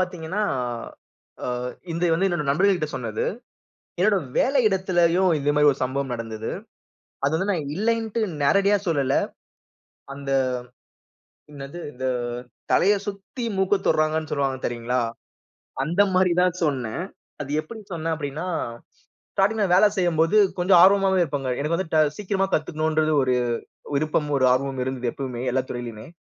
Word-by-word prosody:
பாத்தீங்கன்னா, 185 +2 -2 1.0
அ - - -2 0.4
இது 170 +2 0
வந்து 190 +4 +2
என்னோட 175 -4 -1
நண்பர்கள்ட்ட 175 +1 +2
சொன்னது. 115 -4 -3 0.7
என்னோட 200 +2 +4 0.2
வேலையிடத்துலேயும் 190 -8 +3
இந்த 145 +1 +1
மாதிரி 150 0 +6
ஒரு 135 - -11
சம்பவம் 135 0 -2
நடந்தது. 110 -1 -5 0.8
அது 145 - +1
வந்து 190 +5 -1
நான் 155 -6 -2
இல்லைன்ட்டு, 225 +2 0 0.2
நேரடியா 200 +6 +4
சொல்லல. 140 -4 +1 1.0
அந்த 140 0 -6 1.2
என்னது? 140 +4 -8
இந்த 130 +1 -7 0.7
தலைய 200 +3 +5
சுத்தி 205 +5 -6
மூக்க 190 +1 +3
தொடுறாங்கன்னு 155 0 +1
சொல்லுவாங்க 135 -2 0
தெரியுங்களா? 120 +1 -1 0.8
அந்த 175 +6 +3
மாரி 185 -1 +4
தான் 180 -1 +2
சொன்னேன். 130 0 -1 0.4
அது 140 - -8
எப்படி 220 +8 -10
சொன்னேன்? 165 0 -1
அப்படீன்னா, 150 +3 -4 0.9
ஸ்டார்டிங்ல 205 +2 +2
வேலை 210 +3 +6
செய்யும்போது 170 +1 +2 0.2
கொஞ்சம் 180 0 +5
ஆர்வமாவே 195 -1 +5
இருப்பேன்ங்க. 140 -5 -2
எனக்கு 155 +3 0
வந்து 180 -3 -4
ட 155 - +4 0.2
சீக்கிரமா 195 -1 0
கத்துக்கணும்ன்றது 155 0 0
ஒரு 130 -1 +2 0.6
விருப்பமும், 150 0 0
ஒரு 130 - +4
ஆர்வமும் 135 0 -1
இருந்தது 125 -2 -2
எப்பவுமே, 125 -3 -5
எல்லா 130 0 +1
துறையிலயுமே. 120 -3 -6
160 Hz, 130 wpm, -24 LUFS, 135-190 Hz, 1.2 s, மாதிரி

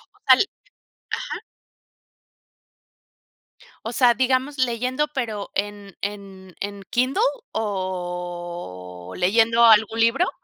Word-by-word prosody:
O - - -25
tal - - +8 0.8
ajá. - - -5 2.5
O 225 - -4
sea, 245 -1 +5
digamos 260 +4 +1
leyendo, 255 +3 0
pero, 220 -6 -3
¿en 205 -1 -4
en 195 -3 -7
en 200 0 -5
Kindle 255 +3 +1 0.3
o 175 - -5
leyendo 225 +5 +4
algún 220 0 +6
libro? 250 +11 +3
205 Hz, 90 wpm, -23 LUFS, 185-240 Hz, 2.5 s, tal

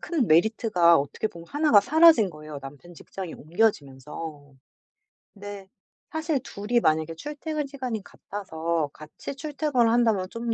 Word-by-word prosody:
큰 320 -9 0
메리트가 175 -1 +4
어떻게 140 +9 -2
보면 170 -5 -10
1 300 +1 +1
가 205 - +8
사라진 305 - +5
거예요 155 -2 -9
남편 145 +6 -11
직장이 185 +1 -8
옮겨지면서. 150 - -3 0.8
근데 200 -1 -9 0.4
사실 315 -2 -1
2 205 -2 -8
이 240 - +5
만약에 160 -4 +1
출퇴근 300 - -4
시간이 255 -6 -4
같아서 165 -5 -4
같이 155 - -9
출퇴근을 280 -4 0
한다면 225 -6 +2
좀 230 +1 -3
205 Hz, 310 characters per minute, -26 LUFS, 160-255 Hz, 0.8 s, 가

